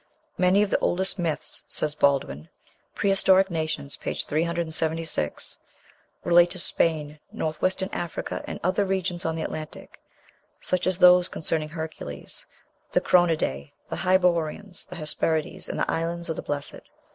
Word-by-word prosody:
"Many 185 Hz, +3 st, +5 dB
of 205 Hz, -, -2 dB
the -, -, +3 dB
oldest 190 Hz, +2 st, 0 dB
myths," 165 Hz, -3 st, -2 dB
says 150 Hz, -1 st, -2 dB
Baldwin 135 Hz, -, +1 dB, 0.5 s
("Prehistoric 195 Hz, -1 st, +4 dB
Nations," 155 Hz, -3 st, -3 dB
p. -, -, -3 dB
376), 160 Hz, -, -2 dB, 0.6 s
"relate 175 Hz, 0 st, +6 dB
to 185 Hz, -, -6 dB
Spain, 155 Hz, -3 st, 0 dB
North 155 Hz, -1 st, -3 dB
western 190 Hz, +1 st, 0 dB
Africa, 175 Hz, -, -4 dB
and -, -, -5 dB
other 185 Hz, +3 st, +2 dB
regions 185 Hz, -2 st, -2 dB
on 160 Hz, 0 st, 0 dB
the 160 Hz, -, -2 dB
Atlantic, 155 Hz, -1 st, -7 dB, 0.6 s
such 185 Hz, 0 st, -1 dB
as 185 Hz, -1 st, +1 dB
those 180 Hz, -1 st, +7 dB
concerning 155 Hz, -1 st, -2 dB
Hercules, 160 Hz, -, -7 dB, 0.5 s
the -, -, +5 dB
Cronidæ, 155 Hz, -, +2 dB, 0.2 s
the -, -, -2 dB
Hyperboreans, 180 Hz, 0 st, +1 dB
the 180 Hz, -, -9 dB
Hesperides, 155 Hz, 0 st, -2 dB
and -, -, -3 dB
the -, -, +1 dB
Islands 170 Hz, +1 st, -2 dB
of 160 Hz, -, -1 dB
the -, -, -4 dB
Blessed. 145 Hz, -1 st, -5 dB
165 Hz, 140 wpm, -26 LUFS, 155-180 Hz, 0.6 s, those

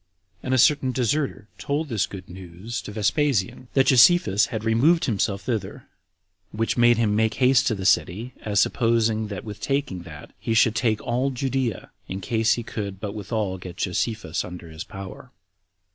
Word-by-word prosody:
And 130 Hz, -, -4 dB
a 130 Hz, -, +3 dB
certain 130 Hz, 0 st, +4 dB
deserter 130 Hz, -1 st, -1 dB
told 150 Hz, +3 st, -2 dB
this 105 Hz, -8 st, 0 dB
good 95 Hz, -2 st, -9 dB
news 95 Hz, +5 st, -7 dB
to -, -, -8 dB
Vespasian, 115 Hz, +2 st, 0 dB
that 135 Hz, -1 st, +5 dB
Josephus 125 Hz, -, +5 dB
had 110 Hz, -3 st, -5 dB
removed 145 Hz, +10 st, +3 dB
himself 100 Hz, -4 st, -1 dB
thither, 115 Hz, 0 st, -4 dB, 0.7 s
which 115 Hz, +1 st, -1 dB
made 120 Hz, -1 st, +5 dB
him 110 Hz, -3 st, +1 dB
make 110 Hz, 0 st, +1 dB
haste 130 Hz, +1 st, +4 dB
to 110 Hz, -, +1 dB
the 95 Hz, -1 st, -6 dB
city, 100 Hz, +7 st, +1 dB
as 105 Hz, -2 st, 0 dB
supposing 115 Hz, -1 st, +1 dB
that 100 Hz, -3 st, -6 dB
with 105 Hz, -1 st, -8 dB
taking 135 Hz, -10 st, -2 dB
that -, -, -11 dB
he 115 Hz, -, -1 dB
should 115 Hz, -1 st, +4 dB
take 110 Hz, -2 st, 0 dB
all 125 Hz, +3 st, 0 dB
Judea, 130 Hz, -4 st, -2 dB, 0.2 s
in 95 Hz, -, -5 dB
case 110 Hz, +3 st, +1 dB
he 120 Hz, -, -5 dB
could 100 Hz, -5 st, -5 dB
but 100 Hz, -1 st, -5 dB
withal 105 Hz, -2 st, -3 dB
get 90 Hz, 0 st, -9 dB
Josephus 90 Hz, -2 st, -2 dB
under 90 Hz, -2 st, -9 dB
his 80 Hz, +1 st, -7 dB
power. 95 Hz, -1 st, -10 dB
110 Hz, 175 wpm, -24 LUFS, 100-125 Hz, 0.7 s, that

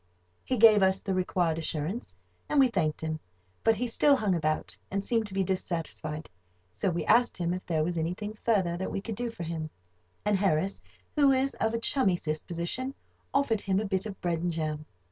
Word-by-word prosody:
He 255 Hz, -, -1 dB
gave 215 Hz, -2 st, +8 dB
us 190 Hz, 0 st, +3 dB
the 195 Hz, -, -1 dB
required 180 Hz, -3 st, +1 dB
assurance, 160 Hz, +7 st, -3 dB, 0.3 s
and 295 Hz, -, +3 dB
we 265 Hz, -2 st, +6 dB
thanked 165 Hz, -9 st, 0 dB
him, 160 Hz, 0 st, -2 dB, 0.4 s
but 225 Hz, 0 st, +4 dB
he 240 Hz, +4 st, -1 dB
still 280 Hz, +4 st, +4 dB
hung 210 Hz, -7 st, +1 dB
about, 155 Hz, -2 st, -1 dB
and 195 Hz, 0 st, -1 dB
seemed 225 Hz, -1 st, +1 dB
to 190 Hz, -, -9 dB
be 195 Hz, -, +2 dB
dissatisfied, 165 Hz, -4 st, -3 dB, 0.4 s
so 140 Hz, -, -1 dB
we 175 Hz, -1 st, -2 dB
asked 240 Hz, +2 st, +4 dB
him 175 Hz, 0 st, 0 dB
if 185 Hz, -, -4 dB
there 160 Hz, -3 st, +1 dB
was 170 Hz, +1 st, -1 dB
anything 180 Hz, +6 st, -3 dB
further 205 Hz, -6 st, +1 dB
that 190 Hz, -, -3 dB
we -, -, -2 dB
could 220 Hz, +3 st, -5 dB
do 240 Hz, +3 st, -3 dB
for 230 Hz, -7 st, -7 dB
him; 160 Hz, -1 st, -4 dB, 0.6 s
and 210 Hz, -1 st, +3 dB
Harris, 190 Hz, 0 st, +1 dB, 0.3 s
who 285 Hz, -3 st, +5 dB
is 265 Hz, +1 st, +2 dB
of 220 Hz, +1 st, 0 dB
a -, -, 0 dB
chummy 230 Hz, -6 st, +2 dB
disposition, 170 Hz, -, -3 dB, 0.4 s
offered 235 Hz, -7 st, +2 dB
him 195 Hz, -1 st, +1 dB
a 215 Hz, -, -1 dB
bit 195 Hz, +1 st, -1 dB
of 195 Hz, -3 st, -8 dB
bread 170 Hz, -2 st, 0 dB
and 175 Hz, +1 st, -1 dB
jam. 155 Hz, -2 st, -3 dB
190 Hz, 200 wpm, -29 LUFS, 165-225 Hz, 0.6 s, gave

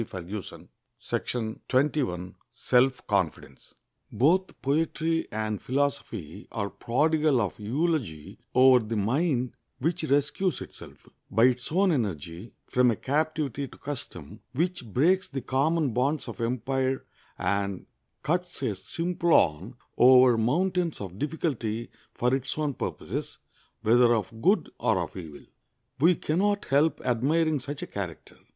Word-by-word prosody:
[Illustration: 95 Hz, -1 st, -7 dB, 1.8 s
SELF 130 Hz, +1 st, +2 dB
CONFIDENCE.] 70 Hz, -, -2 dB, 0.4 s
Both 180 Hz, +8 st, +2 dB
poetry 165 Hz, +3 st, 0 dB
and 110 Hz, -1 st, -2 dB
philosophy 125 Hz, -, -2 dB
are 100 Hz, -3 st, -3 dB
prodigal 150 Hz, +6 st, +2 dB
of 100 Hz, -6 st, -2 dB
eulogy 120 Hz, -, -2 dB, 0.2 s
over 130 Hz, -1 st, +7 dB
the 110 Hz, +1 st, -3 dB
mind 125 Hz, -, 0 dB, 0.2 s
which 165 Hz, +5 st, -1 dB
rescues 150 Hz, +6 st, +1 dB
itself, -, -, -11 dB, 0.2 s
by 115 Hz, -, +3 dB
its 125 Hz, +1 st, +2 dB
own 190 Hz, +3 st, +3 dB
energy, 95 Hz, -, -3 dB
from 125 Hz, 0 st, +3 dB
a 115 Hz, -, +2 dB
captivity 145 Hz, 0 st, -1 dB
to -, -, -15 dB
custom, 105 Hz, -, -7 dB
which 165 Hz, -2 st, -1 dB
breaks 180 Hz, -, +3 dB
the 135 Hz, -2 st, -5 dB
common 140 Hz, +1 st, +1 dB
bonds 135 Hz, +5 st, 0 dB
of -, -, -7 dB
empire 130 Hz, +3 st, -1 dB, 0.3 s
and 100 Hz, -1 st, -1 dB, 0.4 s
cuts 175 Hz, -2 st, -1 dB
a 115 Hz, -, +1 dB
Simplon 155 Hz, -, +1 dB, 0.2 s
over 125 Hz, -1 st, +7 dB
mountains 170 Hz, +9 st, 0 dB
of 95 Hz, -1 st, -7 dB
difficulty 125 Hz, -7 st, -2 dB, 0.2 s
for 125 Hz, +1 st, +1 dB
its 130 Hz, +1 st, -1 dB
own 150 Hz, -2 st, 0 dB
purposes, -, -, -4 dB, 0.5 s
whether 120 Hz, +1 st, +5 dB
of 110 Hz, +1 st, -4 dB
good 195 Hz, +6 st, +2 dB
or 110 Hz, -, +2 dB
of 85 Hz, -2 st, -3 dB
evil. 80 Hz, -6 st, -9 dB, 0.5 s
We 170 Hz, +5 st, +5 dB
can 155 Hz, +2 st, -1 dB
not 205 Hz, 0 st, +1 dB
help 145 Hz, +4 st, +2 dB
admiring 145 Hz, +6 st, +1 dB
such 140 Hz, +3 st, -6 dB
a -, -, -5 dB
character. 90 Hz, -6 st, -6 dB
130 Hz, 125 wpm, -27 LUFS, 110-155 Hz, 1.8 s, over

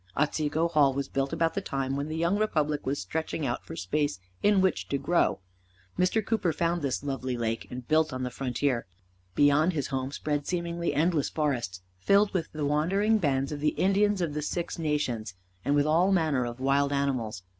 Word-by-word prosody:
Otsego 155 Hz, +2 st, +1 dB
Hall 150 Hz, -5 st, +3 dB
was 140 Hz, -1 st, -2 dB
built 135 Hz, 0 st, -1 dB
about 165 Hz, -1 st, +1 dB
the -, -, -2 dB
time 135 Hz, -1 st, -2 dB
when 140 Hz, +1 st, -2 dB
the 155 Hz, +1 st, -4 dB
young 170 Hz, +5 st, +1 dB
republic 150 Hz, -9 st, 0 dB
was 140 Hz, +2 st, 0 dB
stretching 160 Hz, -, -3 dB
out 120 Hz, -2 st, -2 dB
for -, -, -8 dB
space 120 Hz, -, -1 dB, 0.2 s
in 205 Hz, -1 st, +4 dB
which 190 Hz, 0 st, +1 dB
to 140 Hz, -, +1 dB
grow. 155 Hz, -, +1 dB, 0.5 s
Mr. 190 Hz, +4 st, +1 dB
Cooper 200 Hz, -6 st, +1 dB
found 170 Hz, +2 st, 0 dB
this 140 Hz, -1 st, -2 dB
lovely 130 Hz, -3 st, -3 dB
lake, 115 Hz, -1 st, -2 dB
and 125 Hz, -1 st, -7 dB
built 155 Hz, 0 st, +3 dB
on 130 Hz, 0 st, -4 dB
the 125 Hz, -, -3 dB
frontier. 125 Hz, -2 st, -1 dB, 0.5 s
Beyond 145 Hz, +5 st, +4 dB
his 145 Hz, -5 st, -2 dB
home 130 Hz, 0 st, -2 dB
spread 145 Hz, 0 st, -2 dB
seemingly 170 Hz, -1 st, -1 dB
endless 155 Hz, -1 st, +2 dB
forests, 120 Hz, -, -2 dB, 0.2 s
filled 200 Hz, -, +3 dB
with 170 Hz, -4 st, -2 dB
the 150 Hz, -1 st, -3 dB
wandering 195 Hz, +9 st, +2 dB
bands 135 Hz, -5 st, 0 dB
of 150 Hz, -, -4 dB
the 150 Hz, +1 st, +1 dB
Indians 200 Hz, +1 st, +2 dB
of 165 Hz, -4 st, -1 dB
the 150 Hz, -, -2 dB
Six 170 Hz, +3 st, -3 dB
Nations, 125 Hz, -, -1 dB, 0.3 s
and 140 Hz, -, +1 dB
with 145 Hz, 0 st, +3 dB
all 170 Hz, +5 st, +3 dB
manner 155 Hz, -9 st, +2 dB
of 120 Hz, +1 st, -7 dB
wild 140 Hz, +2 st, +2 dB
animals. 130 Hz, -9 st, -1 dB
150 Hz, 195 wpm, -28 LUFS, 135-170 Hz, 0.5 s, in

